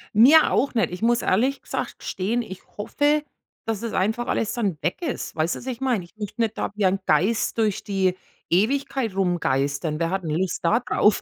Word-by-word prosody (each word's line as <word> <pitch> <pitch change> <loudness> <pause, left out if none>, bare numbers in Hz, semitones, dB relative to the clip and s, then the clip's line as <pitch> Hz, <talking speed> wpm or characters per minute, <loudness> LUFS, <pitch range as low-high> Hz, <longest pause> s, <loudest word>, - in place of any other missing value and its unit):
Mir 280 +9 +7
auch 275 - +1
nicht. 220 -8 +1
Ich 180 - -7
muss 235 +1 +3
ehrlich 255 +9 +1
gesagt - - -4
gestehen, 215 +6 -1
ich 190 -5 -8 0.2
hoffe, 290 +8 +1 0.4
dass, 225 -3 -2
das 230 -1 -5
einfach 220 +5 0
alles 220 - 0
dann 205 -9 -1
weg 175 - -2
ist. 305 -8 -4
Weißt 160 +2 0
du, - - -7
was - - -12
ich 250 -1 -4
meine? 250 -8 0
Ich 175 - -18
möchte 210 +2 -5
nicht 225 -2 0
da - - -2
wie 205 -2 +1
ein 190 +1 +2
Geist 205 +10 +2
durch 215 -3 0
die 190 -2 0 0.3
Ewigkeit 240 +3 +1
rumgeistern. 150 -4 0
Wer 165 0 0
hat 190 -1 -2
'n 160 - -4
Lust 185 0 -1
da 220 +8 +4
drauf? 210 -3 +2
210 Hz, 210 wpm, -24 LUFS, 180-240 Hz, 0.4 s, Mir